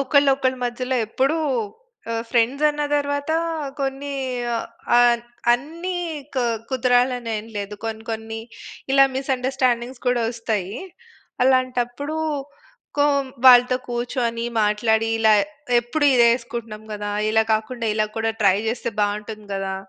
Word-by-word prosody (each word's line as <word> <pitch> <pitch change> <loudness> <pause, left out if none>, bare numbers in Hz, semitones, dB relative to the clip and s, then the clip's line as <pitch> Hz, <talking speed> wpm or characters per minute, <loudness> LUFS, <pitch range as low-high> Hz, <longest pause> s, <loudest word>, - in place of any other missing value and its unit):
ఒకళ్ళ, 280 +1 +3
ఒకళ్ళ 260 -1 0
మధ్యలో 250 +1 -2
ఎప్పుడూ 270 +8 +1 0.8
ఆహ్, 230 - -1
ఫ్రెండ్స్ 250 +5 +2
అన్న 295 0 -3
తరువాత 285 +1 -1 0.5
కొన్ని 275 +1 -3 0.8
ఆహ్, 240 -1 +5 0.3
అన్నీ 335 +8 -3 0.4
క్ - - +3 0.3
కుదరాలనెం 245 -3 +1
లేదు. 200 +1 -5
కొన్ని, 220 0 -4
కొన్ని 225 0 -5 0.5
ఇలా 275 0 +7
మిసండర్స్టాండింగ్స్ 255 -2 -1
కూడా 245 -1 +2
ఒస్తాయి. 220 -3 -3 0.7
అలాంటప్పుడు, 255 +3 +1 0.8
కొ 290 - +5 0.4
వాళ్ళతో 250 0 +8
కూర్చొని, 240 -1 -2 0.2
మాట్లాడి 220 +1 +2
ఇలా 220 -1 +5 0.5
ఎప్పుడు 265 +6 -2
ఇదే 235 -1 +6
ఎసుకుంటున్నాం 230 -3 -7
కదా! 205 0 -4 0.2
ఇలా 220 0 +4
కాకుండా 225 +2 -1
ఇలా 215 0 +1
కూడా 225 0 0
ట్రై 195 -1 +5
చేస్తే 235 0 -2
బాగుంటుంది 210 +1 -2
గదా! 195 0 -2
240 Hz, 115 wpm, -22 LUFS, 220-260 Hz, 0.8 s, వాళ్ళతో